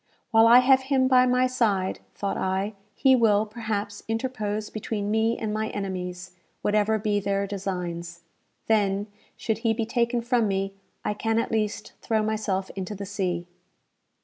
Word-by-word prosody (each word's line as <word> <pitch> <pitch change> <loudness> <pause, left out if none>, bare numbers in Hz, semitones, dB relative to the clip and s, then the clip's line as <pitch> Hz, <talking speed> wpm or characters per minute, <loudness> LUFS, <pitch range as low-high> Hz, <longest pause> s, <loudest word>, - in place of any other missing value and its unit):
"While 225 0 +6
I 240 +2 +8
have 265 +1 +5
him 260 -2 +3
by 255 -1 +5
my 250 +1 +3
side," 210 -7 0 0.2
thought 200 - -2
I, 190 +3 -1 0.2
"he 265 -1 +5
will, 215 -3 +3
perhaps, 210 -2 -4
interpose 215 -3 -2
between 210 -1 -3
me 220 +1 +2
and 215 -1 -3
my 220 0 -1
enemies, 185 -2 -5 0.3
whatever 210 +1 +2
be 210 -1 0
their 200 0 0
designs. 175 -4 -4 0.4
Then, 205 -2 +2 0.3
should 220 -1 -2
he 225 -1 +1
be 225 - -1
taken 235 +1 0
from 240 -2 +2
me, 195 0 -1 0.3
I - - +1
can 225 +2 -1
at 230 - 0
least 215 -2 -2
throw 220 -1 +1
myself 210 -3 -1
into 195 +2 -5
the 200 +1 -6
sea." 185 -3 -2
215 Hz, 160 wpm, -26 LUFS, 195-225 Hz, 0.4 s, I